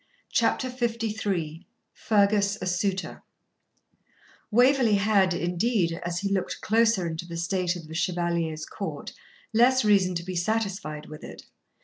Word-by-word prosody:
CHAPTER 260 - +1
LIII 210 -8 -2 0.3
FERGUS 205 -1 +2
A - - -4
SUITOR 185 +1 -2 1.3
Waverley 245 -1 +4
had, 200 -3 +3
indeed, 175 0 0
as 175 +2 -3
he 200 0 -1
looked 190 -2 -2
closer 220 -4 +2
into 165 +1 -4
the 170 -1 -6
state 180 +1 0
of 165 -3 -9
the 160 - -9
Chevalier's 170 -2 -1
court, - - -6 0.4
less 245 +2 +4
reason 195 -3 +3
to 170 - -3
be 185 +1 -5
satisfied 190 -5 -2
with 155 0 -11
it. - - -10
190 Hz, 130 wpm, -26 LUFS, 170-215 Hz, 1.3 s, Waverley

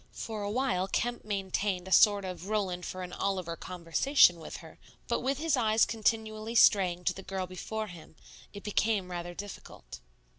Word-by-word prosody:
For 220 -2 -5
a 205 - -2
while 225 -5 0
Kemp 240 +4 -2
maintained 195 -2 -2
a - - -8
sort 200 +2 +6
of 185 0 -6
Roland 190 -5 -1
for 185 0 -5
an 180 - -8
Oliver 185 -4 -2
conversation 175 - +3
with 160 - -8
her; - - -14 0.3
but - - 0
with 270 +1 -1
his 315 0 +1
eyes 220 -3 +3
continually 220 0 -1
straying 185 -6 +5
to - - +1
the 190 - -9
girl 190 -1 -4
before 215 +4 -5
him, 175 -5 -12 0.4
it 200 - -10
became 210 -3 0
rather 175 0 -5
difficult. 200 - -9
200 Hz, 175 wpm, -30 LUFS, 180-220 Hz, 0.4 s, sort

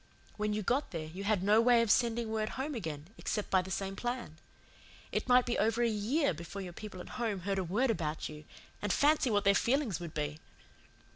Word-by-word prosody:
When 210 0 -1
you 210 0 -1
got 260 +9 +1
there 165 -3 -4
you 180 +6 -7
had 205 -3 +2
no 210 +3 +5
way 235 0 +5
of 220 - +2
sending 235 -1 +2
word 215 -1 -1
home 285 +3 -2
again 160 - -5
except 210 - -2
by 190 - +5
the 185 - -9
same 195 0 -3
plan. 240 -10 -4 0.7
It - - -2
might 250 0 +6
be 240 - -1
over 230 +2 +2
a - - +4
year 225 - +1
before 170 +5 -7
your 180 -2 -7
people 195 -1 -8
at - - -10
home 210 -5 -1
heard 195 +1 -1
a - - 0
word 220 +9 +1
about 155 -7 -2
you 150 0 -10 0.4
and 205 - 0
fancy 295 -2 +3
what 205 -2 +2
their 200 -1 +5
feelings 235 - +1
would 170 -3 -7
be! 150 0 -2
210 Hz, 220 wpm, -32 LUFS, 180-235 Hz, 0.7 s, might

